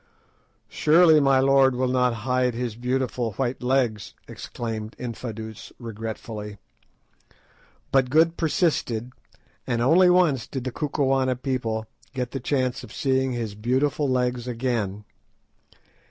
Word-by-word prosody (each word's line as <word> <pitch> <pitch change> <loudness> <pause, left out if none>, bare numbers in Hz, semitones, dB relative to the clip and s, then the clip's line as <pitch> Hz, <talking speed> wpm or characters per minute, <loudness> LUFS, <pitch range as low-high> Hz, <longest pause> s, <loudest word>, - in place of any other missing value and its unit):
"Surely 160 0 +5
my 135 -2 +4
lord 135 -1 +4
will 130 +1 0
not 125 0 +2
hide 125 -2 +1
his 120 -2 -3
beautiful 125 -2 -2
white 130 +3 -2
legs!" 125 -5 0
exclaimed 110 -2 -6
Infadoos 110 -3 -7
regretfully. 110 -2 -7 1.3
But 130 -2 +3
Good 165 +4 +4
persisted, 150 - 0 0.6
and 120 -2 0
once 180 +4 +6
only 155 -8 +3
did 130 -3 -4
the 130 - -3
Kukuana 135 -2 0
people 120 -4 -2 0.3
get 125 -2 -3
the 135 - -4
chance 130 -1 -1
of 115 - -11
seeing 130 0 0
his 115 -4 -3
beautiful 130 +6 0
legs 125 -1 0
again. 115 -5 -2
125 Hz, 120 wpm, -24 LUFS, 115-135 Hz, 1.3 s, once